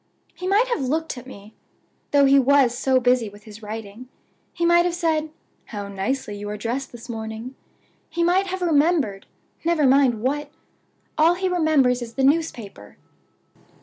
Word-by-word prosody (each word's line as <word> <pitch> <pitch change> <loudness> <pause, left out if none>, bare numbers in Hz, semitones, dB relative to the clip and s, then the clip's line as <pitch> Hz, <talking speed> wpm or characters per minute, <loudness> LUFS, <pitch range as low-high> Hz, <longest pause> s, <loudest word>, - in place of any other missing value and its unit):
"He 365 - -6
might 415 +6 +3
have 480 - -1
looked 310 +5 -2
at 250 0 -11
me, 210 -3 -12 0.6
though 285 -1 +4
he 275 0 +6
was 270 -2 +4
so 260 +1 +2
busy 245 -3 +2
with 205 +1 -16
his 215 0 -12
writing. 220 +3 -8 0.4
He 340 - -2
might 345 0 +5
have 350 -1 -1
said, 320 -3 0 0.4
'How 205 -2 -7
nicely 205 +3 -3
you 205 0 -6
are 210 - -4
dressed 240 +5 -4
this 240 0 -11
morning!' 220 +1 -6 0.6
He 340 +1 -1
might 370 +3 +2
have 375 0 -4
remembered 295 - +1 0.4
never 330 -3 +2
mind 260 -4 +3
what! 290 +3 -1 0.7
All 330 +3 +5
he 375 +1 -1
remembers 310 -8 +2
is 230 -1 -8
the 270 - 0
newspaper." 255 - -1
265 Hz, 165 wpm, -23 LUFS, 225-325 Hz, 0.7 s, he